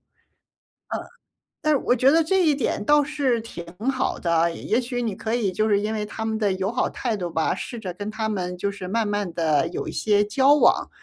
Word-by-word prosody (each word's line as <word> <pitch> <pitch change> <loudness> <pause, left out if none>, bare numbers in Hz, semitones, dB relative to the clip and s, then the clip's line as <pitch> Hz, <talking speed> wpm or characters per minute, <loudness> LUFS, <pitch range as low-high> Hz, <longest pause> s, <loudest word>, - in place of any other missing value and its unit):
嗯。 - - -52 1.6
但 305 - +4
是 - - +4
我 250 - +1
觉 260 +3 +4
得 330 +1 +5
这 375 +1 +2
一 300 - +4
点 245 -6 -1
倒 295 0 +5
是 275 -5 0
挺 175 -6 -9 0.2
好 265 0 -1
的。 170 -1 +2
也 230 +8 -1
许 245 0 -3
你 220 -5 -2
可 220 +1 -3
以 225 -5 +1
就 215 +3 +1
是 200 -1 +3
因 215 +2 -2
为 210 -1 -2
他 220 +1 -5
们 220 0 -1
的 205 -3 +1
友 190 +1 -2
好 250 - 0
态 235 -4 -2
度 175 -2 -3
吧， 160 0 0
试 235 - -6
着 185 -5 -5
跟 205 +3 -5
他 220 0 -2
们， 180 -4 -3
就 200 - -1
是 200 -2 -7
慢 225 0 0
慢 205 -4 -2
地 155 -4 +1
有 - - -5
一 - - -4
些 210 -1 +2
交 265 +7 +4
往， - - +3
220 Hz, 250 characters per minute, -24 LUFS, 195-250 Hz, 1.6 s, 得